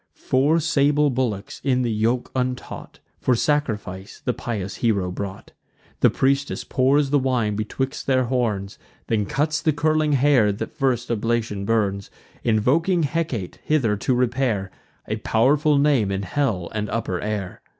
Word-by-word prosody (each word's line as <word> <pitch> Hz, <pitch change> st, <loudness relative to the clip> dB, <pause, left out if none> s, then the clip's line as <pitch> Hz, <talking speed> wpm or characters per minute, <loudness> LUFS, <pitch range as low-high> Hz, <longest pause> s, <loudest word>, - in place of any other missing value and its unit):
Four 145 Hz, +6 st, +2 dB
sable 150 Hz, -2 st, +2 dB
bullocks, 120 Hz, -6 st, -3 dB
in 130 Hz, -2 st, +2 dB
the 120 Hz, -, 0 dB
yoke 115 Hz, +3 st, 0 dB
untaught, 125 Hz, -1 st, -4 dB, 0.2 s
For 130 Hz, -, +2 dB
sacrifice 110 Hz, -9 st, -2 dB
the 125 Hz, -, +1 dB
pious 105 Hz, -5 st, -4 dB
hero 100 Hz, -6 st, 0 dB
brought. 95 Hz, +1 st, -6 dB, 0.5 s
The -, -, +5 dB
priestess 140 Hz, +1 st, 0 dB
pours 135 Hz, +2 st, +2 dB
the 145 Hz, -, +4 dB
wine 125 Hz, -6 st, 0 dB
betwixt 130 Hz, +6 st, -3 dB
their 130 Hz, -1 st, +3 dB
horns; 115 Hz, -6 st, -2 dB, 0.3 s
Then 105 Hz, -3 st, 0 dB
cuts 150 Hz, +1 st, 0 dB
the 155 Hz, -, +2 dB
curling 155 Hz, 0 st, +1 dB
hair; 135 Hz, -6 st, +4 dB
that 100 Hz, -, -6 dB
first 125 Hz, -3 st, 0 dB
oblation 115 Hz, -3 st, -1 dB
burns, 100 Hz, -3 st, 0 dB, 0.3 s
Invoking 155 Hz, -, +2 dB
Hecate 140 Hz, -, -2 dB
hither 130 Hz, -9 st, +1 dB
to 125 Hz, +5 st, 0 dB
repair: 120 Hz, -6 st, 0 dB, 0.4 s
A 110 Hz, -, -2 dB
pow'rful 140 Hz, +7 st, +2 dB
name 140 Hz, -8 st, +3 dB
in 95 Hz, 0 st, -2 dB
hell 100 Hz, -4 st, -1 dB
and 105 Hz, -1 st, -2 dB
upper 105 Hz, -5 st, -2 dB
air. 105 Hz, -3 st, -4 dB
125 Hz, 145 wpm, -23 LUFS, 105-140 Hz, 0.5 s, The